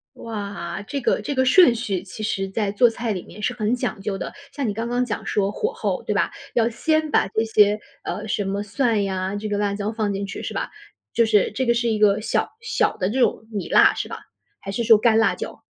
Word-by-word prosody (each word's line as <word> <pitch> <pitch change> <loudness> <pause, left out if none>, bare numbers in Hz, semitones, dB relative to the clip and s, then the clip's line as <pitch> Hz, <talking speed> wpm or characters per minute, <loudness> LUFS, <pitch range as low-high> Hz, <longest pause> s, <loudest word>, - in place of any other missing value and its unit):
哇， 200 -5 -5
这 280 +7 -4
个 - - +1
这 285 - -3
个 260 - +2
顺 260 -1 +6
序 200 -6 -2
其 200 +3 -9
实 195 -2 -1
在 200 0 -1
做 235 +3 +5
菜 230 -1 -3
里 185 - -4
面 210 - -12
是 250 - 0
很 220 0 0
讲 240 - -3
究 195 -1 -3
的， - - -5 0.2
像 275 -6 -2
你 205 - -2
刚 230 +2 -3
刚 245 +1 +1
讲 220 -4 -4
说 200 -1 +1
火 440 - -2
候， 465 0 -2
对 - - -2
吧？ - - +1 0.2
要 230 -1 +3
先 310 +6 0
把 - - +3
这 220 +2 0
些， 210 -1 +4 0.2
呃， 210 - -4
什 205 -1 -1
么 195 +1 -2
蒜 220 -1 +1
呀， 190 0 -2
这 215 +1 -4
个 205 0 -1
辣 205 -1 0
椒 210 +2 -3
放 215 -2 -1
进 200 +1 -3
去 - - -7
是 - - -5
吧？ - - -3 0.4
就 230 - +3
是 210 -3 +3
这 260 +4 -1
个 235 - +4
是 235 0 0
一 220 -2 +1
个 210 0 +4
小 220 - 0
小 465 -1 0
的 185 - -1
这 255 +4 -1
种 220 - +1
米 200 -4 -3
辣 - - +6
是 - - -4
吧？ - - -6 0.4
还 195 - -6
是 235 - -1
说 225 -2 +7
干 225 0 +4
辣 225 - +3
椒？ - - -7
215 Hz, 265 characters per minute, -23 LUFS, 200-240 Hz, 0.4 s, 说